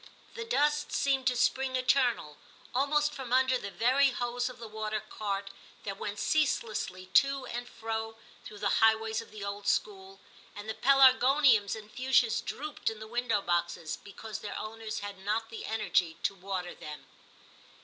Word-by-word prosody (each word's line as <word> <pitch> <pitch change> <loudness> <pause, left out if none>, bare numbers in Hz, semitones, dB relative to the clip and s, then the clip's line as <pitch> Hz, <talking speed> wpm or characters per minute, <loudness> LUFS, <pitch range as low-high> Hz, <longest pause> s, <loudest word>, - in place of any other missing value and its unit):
The 460 -1 -5
dust 295 -10 +1
seemed 270 -2 +1
to 250 - +3
spring 260 +1 +1
eternal, 250 - +1 0.4
almost 295 +3 +2
from 260 -4 -7
under 260 0 +4
the 200 - -5
very 260 +7 +3
hose 245 0 -2
of 255 - -10
the 230 - -8
water 215 0 -3
cart 200 -2 -4 0.3
that 195 -1 -5
went 205 0 -4
ceaselessly 215 -7 0
to 275 -1 +4
and 245 0 -5
fro 225 0 -4 0.3
through 210 - -10
the 200 -1 +1
highways 220 0 +3
of 230 - -13
the 210 -1 -8
old 200 0 -5
school, 195 -2 -1 0.4
and 205 +1 -8
the 220 - -2
pelargoniums 260 -4 +5
and 215 -1 -11
fuchsias 255 -2 +2
drooped 300 +2 -3
in 225 - -7
the 215 - -7
window 230 -3 0
boxes, 170 -2 -1
because 210 +1 -8
their 205 - -6
owners 220 0 -5
had 200 -1 -7
not 215 +3 -2
the 225 - -6
energy 185 -7 +1
to - - +1
water 185 -2 -5
them. 150 -2 -9
225 Hz, 165 wpm, -30 LUFS, 205-260 Hz, 0.4 s, pelargoniums